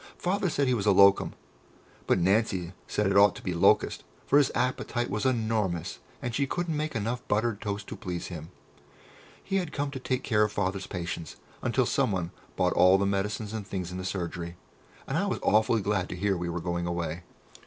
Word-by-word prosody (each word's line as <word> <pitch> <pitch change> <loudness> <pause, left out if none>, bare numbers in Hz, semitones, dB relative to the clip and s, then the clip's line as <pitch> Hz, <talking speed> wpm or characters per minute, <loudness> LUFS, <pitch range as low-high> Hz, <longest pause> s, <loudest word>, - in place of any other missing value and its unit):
Father 190 +1 0
said 140 -3 +1
he 125 - +3
was 105 -4 -1
a - - +7
"locum," 100 0 +5 0.7
but - - +4
Nancy 95 -1 +1
said 105 - 0
it 100 0 +1
ought 100 0 +6
to - - -10
be 90 - -2
"locust," 85 - +3 0.2
for 145 - +5
his 140 - +3
appetite 120 -2 -1
was 110 +6 0
enormous, 110 -8 -1 0.2
and 120 - -2
she 140 +3 +1
couldn't 170 +1 -2
make 155 -1 -2
enough 115 +3 -1
buttered 110 0 0
toast 100 0 -3
to - - -7
please 90 -2 -5
him. 80 -2 -7 0.9
He 195 - -1
had 175 -5 -2
come 145 0 -2
to 135 - -5
take 130 0 -2
care 105 -3 +2
of 105 - 0
Father's 95 -1 -2
patients 85 -3 -5 0.3
until - - +1
someone 90 -4 0 0.2
bought - - +2
all 90 +1 +6
the 100 - +1
medicines 105 +2 -1
and 105 -3 -5
things 90 -2 -4
in 90 - -5
the - - -4
surgery, 85 -2 -4 0.5
and 145 +4 0
I 200 - 0
was 195 - -1
awfully 110 +1 +3
glad 100 -3 0
to - - -4
hear 100 +2 +1
we 85 -1 -3
were 85 0 -3
going 85 0 -2
away. 85 -1 -3
100 Hz, 205 wpm, -28 LUFS, 90-120 Hz, 0.9 s, a